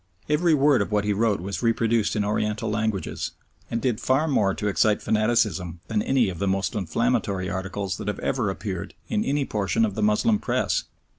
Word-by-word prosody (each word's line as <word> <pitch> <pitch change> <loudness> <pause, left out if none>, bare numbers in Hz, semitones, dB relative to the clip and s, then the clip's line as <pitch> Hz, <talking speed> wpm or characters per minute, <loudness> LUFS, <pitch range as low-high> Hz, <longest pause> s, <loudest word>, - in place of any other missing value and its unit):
Every 155 +2 +3
word 145 -4 +4
of 100 - -2
what 105 -1 +2
he 105 0 +1
wrote 105 -2 +1
was 100 +2 -4
reproduced 115 -1 +1
in 105 -1 0
oriental 105 +1 -1
languages, 105 -2 -2 0.4
and 115 - -1
did 120 -3 -1
far 135 +5 +2
more 100 -10 +2
to 105 - -2
excite 105 +1 +2
fanaticism 105 -6 +1
than 110 -2 +1
any 130 -2 +2
of 90 -3 -5
the 100 - 0
most 95 0 0
inflammatory 105 -1 0
articles 95 0 -3
that - - -7
have 105 - -1
ever 125 -6 -1
appeared 95 -2 -5
in 215 -1 +1
any 140 -3 0
portion 105 +1 +1
of 105 - -3
the 110 - -3
Moslem 105 - +3
Press. - - 0
105 Hz, 195 wpm, -25 LUFS, 100-120 Hz, 0.4 s, word